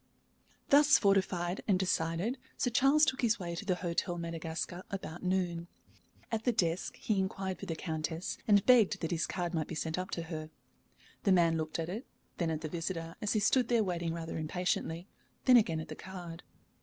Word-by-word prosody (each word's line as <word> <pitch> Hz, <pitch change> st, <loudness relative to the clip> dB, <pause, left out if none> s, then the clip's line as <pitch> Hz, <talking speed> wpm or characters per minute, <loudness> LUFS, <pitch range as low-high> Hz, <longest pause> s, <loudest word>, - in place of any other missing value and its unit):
Thus 295 Hz, 0 st, +7 dB
fortified 190 Hz, -3 st, +1 dB
and 195 Hz, -3 st, +4 dB
decided, 180 Hz, +6 st, 0 dB, 0.2 s
Sir 245 Hz, -, 0 dB
Charles 280 Hz, +5 st, +5 dB
took 265 Hz, -1 st, -1 dB
his 230 Hz, -2 st, +3 dB
way 170 Hz, -2 st, -4 dB
to 185 Hz, +5 st, -5 dB
the 185 Hz, -3 st, +1 dB
Hôtel 175 Hz, 0 st, -2 dB
Madagascar 165 Hz, +1 st, -4 dB
about 175 Hz, -4 st, -6 dB
noon. 180 Hz, -2 st, -1 dB, 0.6 s
At 225 Hz, -1 st, -1 dB
the 245 Hz, -, +3 dB
desk 175 Hz, -5 st, 0 dB
he 210 Hz, -3 st, 0 dB
inquired 190 Hz, 0 st, -2 dB
for -, -, -7 dB
the 165 Hz, -, -2 dB
Countess, 160 Hz, +1 st, -3 dB
and 205 Hz, -2 st, +5 dB
begged 245 Hz, -6 st, +5 dB
that 165 Hz, -, -2 dB
his 170 Hz, -1 st, 0 dB
card 175 Hz, -1 st, -3 dB
might 160 Hz, -2 st, -1 dB
be 165 Hz, -, -5 dB
sent 160 Hz, +2 st, -2 dB
up 185 Hz, -, -4 dB
to 170 Hz, -, -3 dB
her. 155 Hz, -2 st, -6 dB, 0.7 s
The 200 Hz, -, +2 dB
man 170 Hz, -3 st, +4 dB
looked 155 Hz, -1 st, -2 dB
at 165 Hz, -1 st, -2 dB
it, 210 Hz, +9 st, -5 dB, 0.3 s
then 170 Hz, -2 st, +1 dB
at 160 Hz, -1 st, -2 dB
the 155 Hz, -, -3 dB
visitor, 165 Hz, 0 st, -4 dB
as 210 Hz, -, 0 dB
he 215 Hz, -, +2 dB
stood 240 Hz, +4 st, +3 dB
there 235 Hz, -2 st, +3 dB
waiting 170 Hz, -3 st, -2 dB
rather 165 Hz, -1 st, -4 dB
impatiently, 170 Hz, +1 st, -2 dB, 0.4 s
then 255 Hz, -, +7 dB
again 170 Hz, -9 st, +4 dB
at 160 Hz, -, -6 dB
the 155 Hz, -, -7 dB
card. 175 Hz, -2 st, -8 dB
180 Hz, 195 wpm, -32 LUFS, 165-205 Hz, 0.7 s, Thus